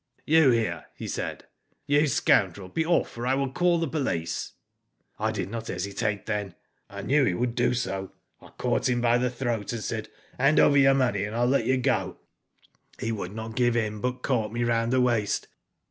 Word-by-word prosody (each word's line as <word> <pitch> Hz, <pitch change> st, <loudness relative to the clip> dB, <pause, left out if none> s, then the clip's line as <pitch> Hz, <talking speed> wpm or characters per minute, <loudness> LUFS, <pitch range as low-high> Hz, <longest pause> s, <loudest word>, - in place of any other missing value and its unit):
*''You 160 Hz, -2 st, +6 dB
here,' 115 Hz, -2 st, -1 dB
he -, -, -7 dB
said. -, -, -4 dB, 0.4 s
'You 145 Hz, +1 st, +3 dB
scoundrel 100 Hz, -7 st, +2 dB
be 160 Hz, -, 0 dB
off 170 Hz, +1 st, +1 dB
or 120 Hz, -, -2 dB
I 130 Hz, -, +3 dB
will 135 Hz, -1 st, -1 dB
call 175 Hz, +3 st, +2 dB
the 165 Hz, -1 st, -1 dB
police.* 130 Hz, -, -2 dB, 0.7 s
"I -, -, 0 dB
did 95 Hz, -, -4 dB
not 115 Hz, -1 st, -5 dB
hesitate 100 Hz, +3 st, -2 dB
then. 105 Hz, -4 st, -3 dB, 0.3 s
I -, -, -7 dB
knew 140 Hz, +1 st, +3 dB
he 95 Hz, -9 st, +1 dB
would 120 Hz, +3 st, -1 dB
do 125 Hz, +1 st, +1 dB
so. 95 Hz, -6 st, -3 dB, 0.3 s
I -, -, -14 dB
caught -, -, 0 dB
him 120 Hz, -1 st, +1 dB
by 120 Hz, 0 st, +3 dB
the 125 Hz, 0 st, +1 dB
throat, 120 Hz, -4 st, -3 dB
and 115 Hz, -3 st, -4 dB
said: 110 Hz, -1 st, -4 dB
" -, -, -28 dB
Hand 140 Hz, +4 st, +4 dB
over 145 Hz, -, +5 dB
your 135 Hz, 0 st, +5 dB
money 130 Hz, -5 st, +1 dB
and 105 Hz, +2 st, -4 dB
Pll 120 Hz, +1 st, +2 dB
let 140 Hz, -, +1 dB
you 130 Hz, -, +3 dB
go 125 Hz, -, 0 dB, 0.8 s
"He 115 Hz, -, -2 dB
would 100 Hz, -3 st, -5 dB
not 110 Hz, 0 st, -6 dB
give 120 Hz, -1 st, +2 dB
in, 105 Hz, -2 st, -2 dB
but 125 Hz, 0 st, -3 dB
caught 115 Hz, -6 st, 0 dB
me 120 Hz, +1 st, -1 dB
round 115 Hz, 0 st, +1 dB
the 130 Hz, 0 st, +3 dB
waist. 115 Hz, -5 st, +1 dB
120 Hz, 205 wpm, -26 LUFS, 110-130 Hz, 0.8 s, You